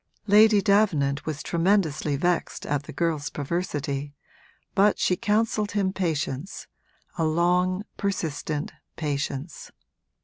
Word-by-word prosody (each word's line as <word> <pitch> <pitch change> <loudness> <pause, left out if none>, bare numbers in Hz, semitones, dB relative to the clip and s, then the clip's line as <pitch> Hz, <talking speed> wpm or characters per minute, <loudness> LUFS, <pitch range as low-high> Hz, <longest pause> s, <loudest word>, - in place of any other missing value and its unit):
Lady 210 0 +6
Davenant 160 -10 +2
was 155 -1 -3
tremendously 165 -5 +1
vexed 175 +4 -1
at 145 -1 0
the - - -8
girl's 155 -1 -1
perversity, 145 -2 -3 0.6
but 205 +1 +4
she 180 - +2
counselled 210 +1 0
him 195 -2 0
patience, 160 -2 -3 0.5
a - - +2
long, 180 +4 +2
persistent 160 -6 -2 0.2
patience. 145 0 -4
170 Hz, 105 wpm, -25 LUFS, 145-200 Hz, 0.6 s, Lady